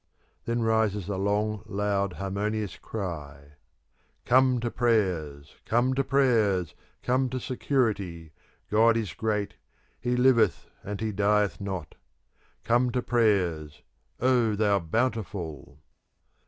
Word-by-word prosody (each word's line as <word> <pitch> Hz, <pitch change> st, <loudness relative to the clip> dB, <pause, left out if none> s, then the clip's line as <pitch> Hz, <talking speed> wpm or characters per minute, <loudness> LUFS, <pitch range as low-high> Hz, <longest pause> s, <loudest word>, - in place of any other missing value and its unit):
Then 115 Hz, 0 st, -1 dB
rises 110 Hz, -4 st, +1 dB
a 100 Hz, -, -1 dB
long, 105 Hz, +2 st, 0 dB
loud, 100 Hz, -1 st, -1 dB
harmonious 100 Hz, +1 st, -3 dB
cry, 75 Hz, -8 st, -7 dB, 0.7 s
"Come 130 Hz, 0 st, +4 dB
to 120 Hz, -1 st, -2 dB
prayers, 90 Hz, -, -1 dB
come 120 Hz, +3 st, +1 dB
to 135 Hz, +1 st, +1 dB
prayers! 110 Hz, -, +2 dB, 0.3 s
Come 130 Hz, +1 st, +1 dB
to 130 Hz, +1 st, -3 dB
security! 105 Hz, -, -1 dB, 0.4 s
God 115 Hz, +2 st, +4 dB
is 110 Hz, -4 st, -3 dB
great! 105 Hz, -2 st, -2 dB, 0.5 s
He 125 Hz, 0 st, -1 dB
liveth 120 Hz, -, +3 dB, 0.2 s
and 100 Hz, 0 st, -5 dB
he 110 Hz, -1 st, -1 dB
dieth 105 Hz, 0 st, +1 dB
not! 95 Hz, -6 st, -5 dB, 0.7 s
Come 120 Hz, +2 st, +2 dB
to 125 Hz, -, 0 dB
prayers! 90 Hz, -10 st, 0 dB, 0.4 s
O 120 Hz, -4 st, +2 dB
thou 100 Hz, -1 st, +2 dB
Bountiful!" 90 Hz, -, -3 dB
105 Hz, 115 wpm, -27 LUFS, 95-120 Hz, 0.7 s, Come